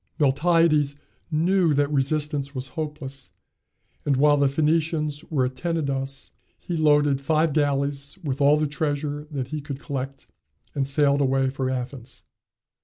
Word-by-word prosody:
Miltiades 150 Hz, 0 st, +3 dB, 0.3 s
knew 170 Hz, 0 st, +2 dB
that 145 Hz, +1 st, +1 dB
resistance 145 Hz, 0 st, 0 dB
was 130 Hz, +1 st, -3 dB
hopeless, 150 Hz, -4 st, -6 dB, 0.7 s
and 140 Hz, -2 st, +1 dB
while 145 Hz, +2 st, +5 dB
the 140 Hz, -1 st, +3 dB
Phoenicians 155 Hz, +1 st, 0 dB
were 135 Hz, -5 st, 0 dB
at 130 Hz, +1 st, -4 dB
Tenedos, 140 Hz, -4 st, -3 dB, 0.3 s
he 175 Hz, -, -4 dB
loaded 145 Hz, -3 st, +3 dB
five 155 Hz, +2 st, +2 dB
galleys 140 Hz, 0 st, 0 dB
with 140 Hz, -2 st, -2 dB
all 145 Hz, +2 st, +5 dB
the 155 Hz, -, +1 dB
treasure 145 Hz, 0 st, -2 dB
that 135 Hz, -5 st, -4 dB
he 150 Hz, +1 st, -4 dB
could 140 Hz, -1 st, -6 dB
collect, 135 Hz, -1 st, -5 dB, 0.5 s
and 140 Hz, -2 st, -1 dB
sailed 140 Hz, 0 st, +3 dB
away 135 Hz, -1 st, +2 dB
for 130 Hz, -1 st, -2 dB
Athens. 125 Hz, -1 st, -5 dB
145 Hz, 140 wpm, -24 LUFS, 135-155 Hz, 0.7 s, while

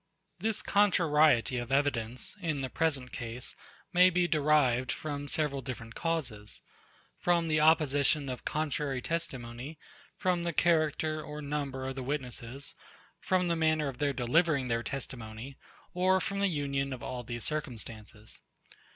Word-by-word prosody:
89. 220 Hz, -, +1 dB
This 220 Hz, -, -1 dB
contrariety 155 Hz, -, +4 dB
of 120 Hz, +2 st, -5 dB
evidence, 130 Hz, -, +1 dB
in 155 Hz, -5 st, -1 dB
the 130 Hz, -, -3 dB
present 145 Hz, -6 st, 0 dB
case, 120 Hz, +2 st, -5 dB, 0.4 s
may 180 Hz, +1 st, +7 dB
be 180 Hz, 0 st, +2 dB
derived 145 Hz, -6 st, +3 dB
from 145 Hz, 0 st, -4 dB
several 145 Hz, -2 st, 0 dB
different 115 Hz, -3 st, -7 dB
causes; 115 Hz, -, -3 dB, 0.6 s
from 170 Hz, -1 st, +2 dB
the 155 Hz, -1 st, +2 dB
opposition 150 Hz, -2 st, +4 dB
of 125 Hz, -2 st, -5 dB
contrary 150 Hz, -3 st, -1 dB
testimony; 130 Hz, -2 st, -4 dB, 0.4 s
from 180 Hz, -3 st, +1 dB
the 170 Hz, 0 st, -1 dB
character 155 Hz, -1 st, +2 dB
or 150 Hz, 0 st, -7 dB
number 140 Hz, -3 st, -3 dB
of 135 Hz, -, -2 dB
the 135 Hz, -, -4 dB
witnesses; 130 Hz, -1 st, -4 dB, 0.5 s
from 185 Hz, -1 st, +1 dB
the 170 Hz, -, +2 dB
manner 155 Hz, -2 st, +2 dB
of 135 Hz, -2 st, -6 dB
their 145 Hz, -1 st, +2 dB
delivering 140 Hz, +1 st, +2 dB
their 115 Hz, 0 st, +1 dB
testimony; 120 Hz, 0 st, -6 dB, 0.4 s
or 185 Hz, +1 st, +3 dB
from 200 Hz, +1 st, -2 dB
the 200 Hz, -, +3 dB
union 140 Hz, -4 st, -1 dB
of 125 Hz, -, -8 dB
all 125 Hz, -1 st, -4 dB
these 120 Hz, -1 st, -5 dB
circumstances. 110 Hz, -7 st, -6 dB
145 Hz, 145 wpm, -31 LUFS, 125-160 Hz, 0.6 s, may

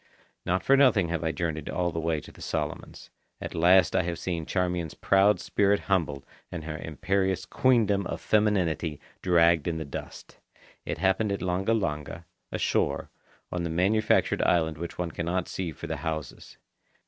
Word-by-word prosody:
Not 90 Hz, +1 st, +1 dB
for 135 Hz, -, +5 dB
nothing 120 Hz, -11 st, +4 dB
have 85 Hz, 0 st, -2 dB
I 80 Hz, -, 0 dB
journeyed 80 Hz, -3 st, -3 dB
all 90 Hz, -1 st, -1 dB
the 80 Hz, -, -3 dB
way 80 Hz, -1 st, 0 dB
to -, -, -13 dB
the -, -, -16 dB
Solomons. -, -, -5 dB, 0.3 s
At -, -, -6 dB
last 90 Hz, +2 st, +4 dB
I -, -, +4 dB
have 85 Hz, -1 st, -3 dB
seen 85 Hz, -3 st, -3 dB
Charmian's 90 Hz, -3 st, -1 dB
proud 100 Hz, +2 st, +3 dB
spirit 100 Hz, 0 st, +1 dB
humbled 75 Hz, -8 st, -1 dB, 0.3 s
and 85 Hz, -3 st, -5 dB
her 80 Hz, 0 st, -5 dB
imperious 95 Hz, +3 st, -1 dB
queendom 110 Hz, -8 st, +2 dB
of -, -, -4 dB
femininity 90 Hz, -8 st, +1 dB, 0.2 s
dragged 85 Hz, -3 st, +4 dB
in 85 Hz, -1 st, -1 dB
the 80 Hz, -, -4 dB
dust. 70 Hz, -, -9 dB, 0.5 s
It -, -, -2 dB
happened 95 Hz, +2 st, +1 dB
at 100 Hz, -, -2 dB
Langa 95 Hz, +5 st, +1 dB
Langa, 75 Hz, -2 st, -4 dB, 0.3 s
ashore, -, -, 0 dB, 0.4 s
on 90 Hz, -, -2 dB
the 85 Hz, -, -2 dB
manufactured 95 Hz, +6 st, +2 dB
island 80 Hz, -3 st, +1 dB
which 85 Hz, 0 st, -6 dB
one 90 Hz, -1 st, -2 dB
cannot 85 Hz, +2 st, -2 dB
see 90 Hz, -3 st, -4 dB
for -, -, -9 dB
the -, -, -3 dB
houses. 80 Hz, -4 st, -6 dB
90 Hz, 170 wpm, -27 LUFS, 80-95 Hz, 0.5 s, for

